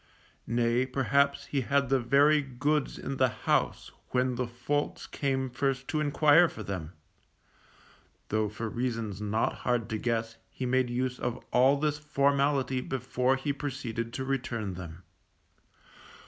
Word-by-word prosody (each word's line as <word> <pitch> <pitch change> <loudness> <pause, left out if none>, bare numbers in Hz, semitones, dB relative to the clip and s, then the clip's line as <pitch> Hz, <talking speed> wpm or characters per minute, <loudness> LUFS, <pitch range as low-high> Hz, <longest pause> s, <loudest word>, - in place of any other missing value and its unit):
Nay, 120 +2 +1
perhaps, 140 +2 +1
he 140 - -1
had 140 +1 +1
the 135 -1 +3
very 145 +5 +4
goods 140 +2 -1
in 135 0 -4
the 130 - +4
house - - -1 0.2
when 125 0 +1
the 125 0 -2
folks 125 +5 -2
came 135 -2 -1
first 135 +1 -1
to 155 - 0
enquire 150 +3 +5
for 110 - -8
them; 90 -4 -5 1.4
though 110 0 +1
for 115 +2 -5
reasons 115 -4 -3
not 105 +2 0
hard 120 -3 0
to 110 -1 -2
guess 115 -1 -1
he 130 - -5
made 130 0 +2
use 125 +1 -2
of 120 -1 -2
all 130 +3 +5
this 150 0 0
formality 140 -2 +1
before 125 0 0
he 140 +2 -2
proceeded 130 -5 -4
to 130 - -3
return 120 -7 -2
them. 85 -1 -9
130 Hz, 145 wpm, -29 LUFS, 115-140 Hz, 1.4 s, enquire